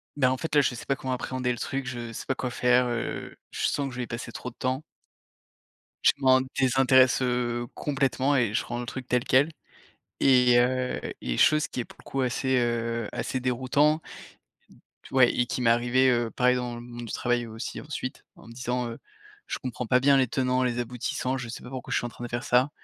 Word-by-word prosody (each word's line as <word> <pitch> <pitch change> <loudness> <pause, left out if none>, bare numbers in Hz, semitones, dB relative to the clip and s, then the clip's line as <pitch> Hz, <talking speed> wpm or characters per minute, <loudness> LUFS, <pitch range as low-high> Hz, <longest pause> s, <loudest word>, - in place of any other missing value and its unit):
«Beh, 130 -3 +3
en 130 0 +1
fait 160 +2 -3
là 145 - +7
je 130 - 0
sais 120 - -8
pas 140 - +1
comment 130 - -5
appréhender 125 0 -2
le 120 - -3
truc, 135 +3 -3
je 120 -2 -5
sais - - -6
pas 135 - -1
quoi 125 - -3
faire, 125 0 +3
heu, 120 -1 -4 0.2
je - - 0
sens 140 -1 -1
que - - -6
je 120 - -9
vais 125 - -2
y - - -17
passer 115 +1 -6
trop 125 - -6
de 120 - -18
temps» 130 +3 -2 1.2
«je - - +6
m'en 130 -1 +5 0.2
désintéresse, 130 0 +4
heu, 120 -1 -1
complètement 140 0 0
et 115 -5 +1
je - - +1
rends 120 - -4
le 120 - -5
truc 130 +1 -6
tel 125 0 +1
quel» 135 +4 +4 0.7
et 125 -2 +5
heu, 125 +1 +1 0.2
et - - -2
chose 155 +1 +4
qui 125 - -4
est - - -6
pour - - -17
le - - -15
coup 135 - -1
assez, 130 +1 +1
heu, 115 -2 0
assez 130 - -3
déroutant 130 +5 +2 1.0
t - - -12
ouais 130 -2 +6
et 120 - +1
qui 125 - -3
m'est 115 - +4
arrivée 120 +2 +3
heu, 120 -2 +1
pareil 125 +1 +2
dans 125 -1 -3
le 120 - -7
monde 120 0 -8
du - - -6
travail 120 -1 0
aussi 110 0 -6
ensuite 135 -3 -6
en - - -16
me 115 - -10
disant: 125 0 -2
«Heu, - - -8 0.5
je - - -3
comprends 125 -1 -5
pas 125 +3 +4
bien 140 +1 +5
les 130 -1 +4
tenants, 130 +1 0
les 120 -1 -1
aboutissants, 125 +2 -2
je 120 -2 -6
sais 115 - -7
pas - - -10
pourquoi 130 -2 -6
je - - +2
suis 120 - -3
en - - -4
train 120 - -9
de - - -4
faire 120 +1 -3
ça 125 +3 +3
125 Hz, 235 wpm, -27 LUFS, 120-130 Hz, 1.2 s, là